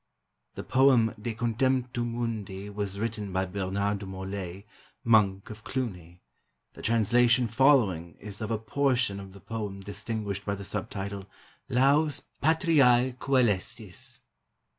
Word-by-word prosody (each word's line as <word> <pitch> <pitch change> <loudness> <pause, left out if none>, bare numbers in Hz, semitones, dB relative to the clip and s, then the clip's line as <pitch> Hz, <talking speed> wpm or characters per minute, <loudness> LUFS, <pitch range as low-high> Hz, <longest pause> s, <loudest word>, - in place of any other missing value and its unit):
[The - - -5
poem 130 -4 +4
De 115 0 -3
Contemptu 120 +1 0
Mundi 110 -4 -4
was 100 -1 -4
written 105 -3 -3
by 95 +1 0
Bernard 100 +2 -1
de 100 - -7
Morlaix, 95 0 -6 0.4
Monk 105 -1 +3
of 110 0 -11
Cluni. 90 -10 -5 0.5
The - - -11
translation 120 +2 +3
following 110 - +3
is 105 +1 -7
of 110 - -3
a 115 - 0
portion 120 -2 +1
of 95 -1 -10
the 100 - -12
poem 105 -3 -5
distinguished 100 0 -4
by 100 -1 -2
the 100 - -8
sub 100 0 -4
title 100 -1 -5 0.2
" - - -34
Laus 145 +3 +3 0.2
Patriae 140 -6 +4
Coelestis." 120 -9 0
110 Hz, 135 wpm, -28 LUFS, 100-120 Hz, 0.5 s, poem